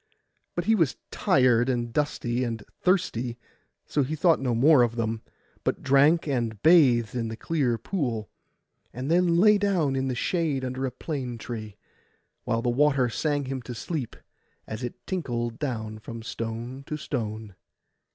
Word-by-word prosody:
But 175 - -1
he 225 - +4
was 165 -11 +2
tired, 125 -2 +3
and 120 -2 -1
dusty, 125 -4 0
and 115 -3 -3 0.2
thirsty; 130 - +1 0.5
so 145 - 0
he 145 +4 -1
thought 165 +2 +4
no 125 -3 0
more 140 +3 +6
of 120 -1 +2
them, 115 -1 -2 0.4
but - - -1
drank 145 +5 +4
and 120 -6 -1
bathed 130 -9 +5
in 120 -2 -2
the 110 0 -6
clear 135 -7 0
pool, 115 - -2 0.6
and 130 +5 -4
then 175 -1 +4
lay 210 +3 +6
down 180 -9 +1
in 135 0 0
the 130 - -1
shade 150 -1 0
under 130 +1 -2
a - - -4
plane 130 -3 -4
tree, 110 -3 -7 0.7
while 115 0 0
the 125 - +1
water 135 -1 +3
sang 145 +3 -1
him 130 0 -4
to 120 +1 -7
sleep, 140 -1 -4 0.5
as 110 +2 -6
it 120 - -6
tinkled 120 -10 -3
down 110 -6 -3
from 115 +1 -8
stone 115 +4 -5
to 150 - -3
stone. 110 -7 -4
125 Hz, 160 wpm, -26 LUFS, 115-150 Hz, 0.7 s, more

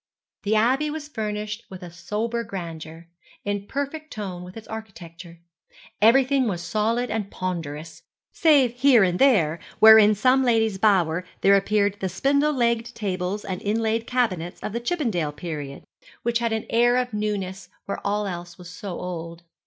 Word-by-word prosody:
The 215 0 0
Abbey 260 +7 +2
was 300 -1 -6
furnished 210 -4 -4
with 185 -1 -10
a 175 - -9
sober 215 +7 -3
grandeur, 165 -4 -8 0.4
in 205 0 -3
perfect 290 +3 -4
tone 190 -5 -6
with 180 +4 -11
its 225 - -10
architecture. 175 -6 -10 0.6
Everything 260 +3 +4
was 175 -5 -3
solid 230 +5 0
and 210 -2 -2
ponderous, 165 -5 -5 0.3
save 280 -7 +4
here 255 -5 +6
and 180 -1 0
there, 170 - +3 0.2
where 220 0 +9
in 210 0 +5
some 255 +5 +3
lady's 225 -5 +2
bower 185 -5 +2 0.2
there 200 0 +6
appeared 200 0 +1
the 190 - -2
spindle 280 - +2
legged 235 -2 0
tables 195 -1 -3
and 185 -2 -4
inlaid 225 +2 -1
cabinets 185 -9 -1
of 215 - -4
the 235 - -1
Chippendale 230 - -1
period, 145 -4 -6 0.4
which 235 0 +1
had 235 -1 -1
an 220 0 -2
air 240 +2 +4
of 250 -2 -1
newness 200 -3 -3 0.2
where 200 - -4
all 205 +1 0
else 175 -2 -6
was 180 -1 -11
so 180 +1 -6
old. 170 -1 -6
210 Hz, 160 wpm, -24 LUFS, 180-235 Hz, 0.6 s, where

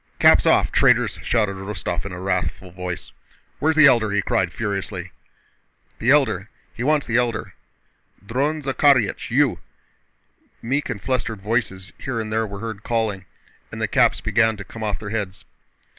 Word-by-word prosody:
"Caps - - +5
off, - - +4
traitors!" - - +3
shouted 105 -5 0
Rostóv 95 -3 -4
in 100 - -5
a 90 - -7
wrathful 90 -1 -2
voice. 90 0 -6 0.5
"Where's 160 +1 +2
the 155 -1 +7
Elder?" 120 -6 +5
he 100 0 0
cried 90 -2 0
furiously. 95 -2 -4 0.9
"The 115 - 0
Elder.... 130 -8 +3 0.2
He - - -8
wants 150 +1 +2
the 115 - +1
Elder!... 120 -2 -1 0.7
Dron 145 +7 -1
Zakhárych, 135 -4 +2
you!" 135 +2 +2 1.0
meek 135 +5 -2
and 120 -5 -3
flustered 120 -2 -2
voices 105 -4 -2
here 130 -4 -3
and 110 -1 -4
there 110 0 0
were 100 0 -8
heard 110 -3 -5
calling 110 -4 -1 0.5
and - - -3
caps - - +3
began 110 -2 +2
to 100 - -7
come 110 +3 -11
off 105 -2 -1
their 105 -2 -7
heads. 100 -3 -4
110 Hz, 160 wpm, -22 LUFS, 100-125 Hz, 1.0 s, the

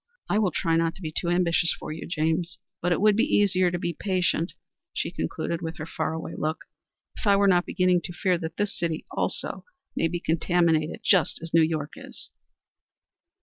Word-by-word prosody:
I 210 - +2
will 205 -4 +3
try 165 0 +1
not 165 0 +1
to - - -13
be 155 -1 -4
too 170 - 0
ambitious 175 -1 +2
for - - -7
you, 155 - -6
James; 165 +1 -1 0.2
but 175 - 0
it 175 - +2
would 210 0 +5
be 245 +8 +2
easier 185 -3 +3
to 175 - -2
be 170 0 -2
patient," 180 -1 0 0.4
she - - -2
concluded, 170 0 -3
with 165 -1 -5
her 155 - -5
far 160 -1 -2
away 160 - -5
look, 155 +2 -3 0.5
"if - - -5
I 200 - +6
were 200 0 +4
not 180 -2 +3
beginning 180 -1 +2
to 180 - -5
fear 175 0 +1
that 165 -1 -6
this 205 -1 -1
city 165 -2 -2
also - - -2 0.3
may 165 - +2
be 175 +1 -3
contaminated 170 +2 +1
just 185 -7 +3
as 165 - -7
New 165 - +6
York 155 -2 0
is." - - -10
170 Hz, 200 wpm, -26 LUFS, 160-185 Hz, 0.5 s, I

